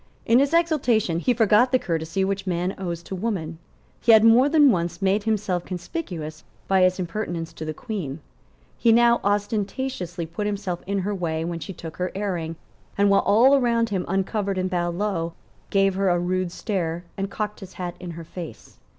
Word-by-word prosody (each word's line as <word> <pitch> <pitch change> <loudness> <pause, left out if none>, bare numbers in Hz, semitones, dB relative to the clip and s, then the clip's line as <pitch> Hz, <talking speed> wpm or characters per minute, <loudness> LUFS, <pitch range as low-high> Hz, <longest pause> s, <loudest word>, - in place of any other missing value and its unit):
In 235 +2 +5
his 280 +1 +2
exultation 265 - +2
he 250 - +1
forgot 225 +1 +4
the 255 - +5
courtesy 165 -1 -1
which 195 0 -2
man 180 +1 -1
owes 170 -3 -4
to - - -8
woman. 180 -5 -3 0.4
He 230 - +5
had 220 -1 +7
more 235 +5 +6
than 295 -3 +6
once 170 -3 -1
made 195 +2 +1
himself 200 -5 0
conspicuous 175 - -6 0.2
by 190 -1 +3
his 185 0 +4
impertinence 175 -3 -4
to 160 - -7
the 155 - -2
Queen. 175 - -5 0.6
He 230 - +4
now 235 +1 +5
ostentatiously 205 -3 -2
put 175 +6 -4
himself 200 -4 -3
in 200 0 -1
her 205 - -1
way 165 -4 -2
when 170 0 -3
she 195 - -6
took 165 -3 -9
her 180 0 -2
airing; 175 -5 -2 0.4
and, 200 0 +4
while 200 - +5
all 240 +7 +5
around 235 -3 +2
him 190 -3 -1
uncovered 195 +1 -1
and 185 0 -1
bowed 175 -1 -1
low, 175 -4 -2 0.4
gave 195 -1 +3
her 195 0 +1
a 175 - +3
rude 180 0 -1
stare 175 -4 -3
and 195 0 -3
cocked 210 +1 -4
his 190 -2 -10
hat 180 -1 -5
in 180 -1 -7
her 170 - -7
face. 170 0 -10
195 Hz, 190 wpm, -24 LUFS, 175-215 Hz, 0.6 s, had